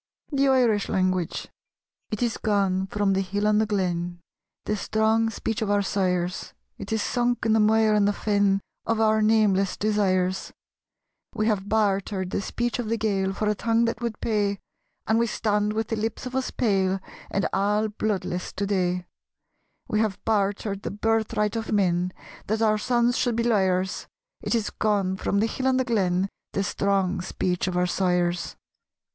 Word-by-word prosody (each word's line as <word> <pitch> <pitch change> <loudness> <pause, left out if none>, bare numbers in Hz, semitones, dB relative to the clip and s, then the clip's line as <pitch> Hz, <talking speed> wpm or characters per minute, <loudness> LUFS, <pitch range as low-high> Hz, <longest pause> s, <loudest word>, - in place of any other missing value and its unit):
The 275 -1 +2
Irish 240 -6 +3
Language 185 -2 0 0.6
It 215 +3 -2
is 235 -2 0
gone 195 -3 +1
from 200 0 +1
the 195 - +1
hill 200 +2 -2
and 210 0 +4
the 220 - 0
glen 175 -4 -1 0.5
The 210 - 0
strong 220 +2 +1
speech 225 +1 -3
of 215 - -1
our 205 0 +2
sires; 180 -2 -1 0.2
It - - -7
is 220 -1 +1
sunk 245 -1 0
in 220 - +3
the 220 - +4
mire 215 0 +4
and 205 -1 +3
the 205 - +2
fen 200 -2 +1 0.3
Of 230 -1 +1
our 220 0 +3
nameless 210 -3 +3
desires: 190 -3 0 0.8
We 215 - 0
have 205 -3 0
bartered 195 -3 0
the - - -1
speech 240 +4 -2
of 230 -3 -3
the 230 - +1
Gael 195 -3 0
For 210 +2 -2
a 210 - +3
tongue 230 +2 +1
that 230 0 -2
would 235 -3 -3
pay, 205 -2 0 0.5
And 225 +1 +2
we 235 - +2
stand 210 -1 0
with 220 0 -2
the 225 - 0
lips 225 +4 -3
of 255 +1 -6
us 265 -1 0
pale 195 -4 +1 0.3
And 195 - 0
all 210 +2 +2
bloodless 205 -4 -2
to 200 - -2
day; 180 -2 0 0.8
We 215 - 0
have 215 -4 0
bartered 200 -1 0
the - - -4
birthright 220 0 0
of 225 0 -3
men 180 -3 +1 0.4
That 220 +2 0
our 215 -1 +3
sons 240 +2 +1
should 245 -3 +1
be 230 - 0
liars. 190 -5 +1 0.3
It - - 0
is 225 -3 -1
gone 200 -3 0
from 200 - 0
the - - +3
hill 260 +3 -2
and 260 0 +3
the 260 - +1
glen, 190 -5 +1 0.3
The 195 - 0
strong 195 -1 0
speech 180 0 -2
of 180 -1 -1
our 180 - +3
sires. 180 -1 0
210 Hz, 180 wpm, -25 LUFS, 190-220 Hz, 0.8 s, and